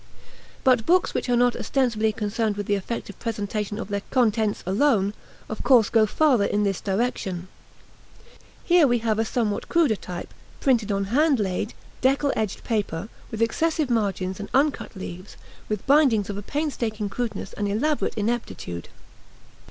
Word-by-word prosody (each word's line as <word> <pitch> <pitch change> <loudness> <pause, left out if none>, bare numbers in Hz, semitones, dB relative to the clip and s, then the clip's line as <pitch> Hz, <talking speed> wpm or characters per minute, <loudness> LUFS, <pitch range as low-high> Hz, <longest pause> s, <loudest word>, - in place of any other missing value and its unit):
But 250 -4 +3
books 365 +1 +3
which - - -2
are 245 - +4
not 245 0 +3
ostensibly 230 -5 +1
concerned 215 0 -1
with 205 - -3
the 205 - 0
effective 200 +1 -4
presentation 210 -1 -3
of 220 - -5
their 200 0 -1
contents 220 -4 +1
alone, 200 0 +2 0.3
of 220 - -5
course 235 -5 +5
go 220 -2 +4
farther 260 -3 +3
in 210 - +1
this 195 -2 -1
direction. 190 -4 -2 1.1
Here 345 -4 +5
we 240 -1 +3
have 220 -1 0
a 225 - +2
somewhat 220 -3 -1
cruder 325 -10 +3
type, 180 -3 -7 0.3
printed 235 -6 +2
on 200 0 0
hand 295 -2 +4
laid, 200 +2 -2 0.3
deckel 275 +2 +2
edged 215 -3 -2
paper, 205 -4 -2 0.2
with 225 0 -1
excessive 310 +3 0
margins 195 -4 -1
and 205 - -6
uncut 280 -3 +1
leaves, 185 0 -8 0.3
with 210 -2 -3
bindings 260 -8 +4
of 200 - -6
a - - -5
painstaking 230 -5 -2
crudeness 230 +3 -4
and 205 - -2
elaborate 280 +10 0
ineptitude. 210 - -3
220 Hz, 155 wpm, -24 LUFS, 205-255 Hz, 1.1 s, course